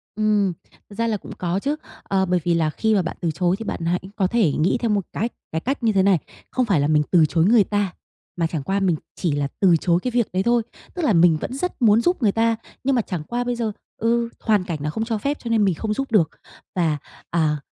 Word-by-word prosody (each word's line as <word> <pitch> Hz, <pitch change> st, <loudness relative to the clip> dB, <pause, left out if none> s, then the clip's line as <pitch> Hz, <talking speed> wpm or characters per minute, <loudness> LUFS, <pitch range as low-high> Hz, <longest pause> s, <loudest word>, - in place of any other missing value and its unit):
Ừm, 210 Hz, -3 st, +2 dB, 0.4 s
thực 205 Hz, -, -12 dB
ra 230 Hz, +1 st, 0 dB
là 215 Hz, -, 0 dB
cũng -, -, -11 dB
có 180 Hz, +2 st, -1 dB
chứ, 285 Hz, +7 st, -1 dB, 0.3 s
ờ, 190 Hz, -1 st, +1 dB
bởi 180 Hz, -1 st, +1 dB
vì 175 Hz, -, +2 dB
là 160 Hz, -2 st, +2 dB
khi 220 Hz, +7 st, +1 dB
mà 195 Hz, -, +3 dB
bạn 170 Hz, -, -5 dB
từ 165 Hz, -2 st, 0 dB
chối 180 Hz, +3 st, +1 dB
thì 225 Hz, -, -6 dB
bạn 165 Hz, -, -4 dB
hãy 180 Hz, +1 st, +1 dB, 0.2 s
có 190 Hz, -, +2 dB
thể 210 Hz, -6 st, +2 dB
nghĩ 155 Hz, -, +1 dB
theo 235 Hz, -, 0 dB
một 205 Hz, -3 st, +1 dB
cách 230 Hz, +3 st, -1 dB, 0.2 s
cái 160 Hz, +1 st, -2 dB
cách 265 Hz, -1 st, -2 dB
như 225 Hz, -, +4 dB
thế 190 Hz, -1 st, +3 dB
này, 195 Hz, -2 st, +4 dB, 0.3 s
không 255 Hz, -, +1 dB
phải 195 Hz, -9 st, +2 dB
là 145 Hz, -, +2 dB
mình 150 Hz, -1 st, +3 dB
từ 170 Hz, -4 st, +6 dB
chối 165 Hz, +2 st, +2 dB
người 220 Hz, 0 st, +6 dB
ta, 205 Hz, -2 st, -1 dB, 0.4 s
mà 165 Hz, -1 st, +1 dB
chẳng 160 Hz, -4 st, -4 dB
qua 195 Hz, +7 st, 0 dB
mình 185 Hz, -4 st, +2 dB, 0.2 s
chỉ 170 Hz, -5 st, -1 dB
là 145 Hz, -1 st, 0 dB
từ 185 Hz, -4 st, +5 dB
chối 170 Hz, +1 st, +2 dB
cái 250 Hz, -, -1 dB
việc 240 Hz, -2 st, +1 dB
đấy 185 Hz, -, +1 dB
thôi. 235 Hz, +1 st, +3 dB, 0.3 s
Tức 355 Hz, -, -3 dB
là 225 Hz, -, +3 dB
mình 170 Hz, -2 st, +5 dB
vẫn -, -, -4 dB
rất 280 Hz, +1 st, -4 dB
muốn 220 Hz, 0 st, +5 dB
giúp 350 Hz, +1 st, +1 dB
người 210 Hz, -3 st, +4 dB
ta, 230 Hz, +1 st, +2 dB, 0.3 s
nhưng 270 Hz, 0 st, +2 dB
mà 240 Hz, -, +3 dB
chẳng 180 Hz, -7 st, -5 dB
qua 240 Hz, +7 st, -2 dB
bây 245 Hz, 0 st, -1 dB
giờ, 230 Hz, -2 st, -1 dB, 0.3 s
ừ, 235 Hz, +1 st, +1 dB
hoàn 210 Hz, -4 st, +2 dB
cảnh 170 Hz, -4 st, -4 dB
nó 150 Hz, -, -2 dB
không 220 Hz, +8 st, -2 dB
cho 225 Hz, -1 st, -1 dB
phép 280 Hz, +7 st, -2 dB
cho 235 Hz, -, -6 dB
nên 225 Hz, -2 st, +3 dB
mình 190 Hz, -4 st, +2 dB
không 215 Hz, +5 st, -2 dB
giúp 270 Hz, +2 st, -3 dB
được. 175 Hz, -8 st, +4 dB, 0.5 s
Và, 160 Hz, -5 st, +1 dB, 0.3 s
à, 155 Hz, -3 st, +1 dB
200 Hz, 270 wpm, -22 LUFS, 170-230 Hz, 0.5 s, từ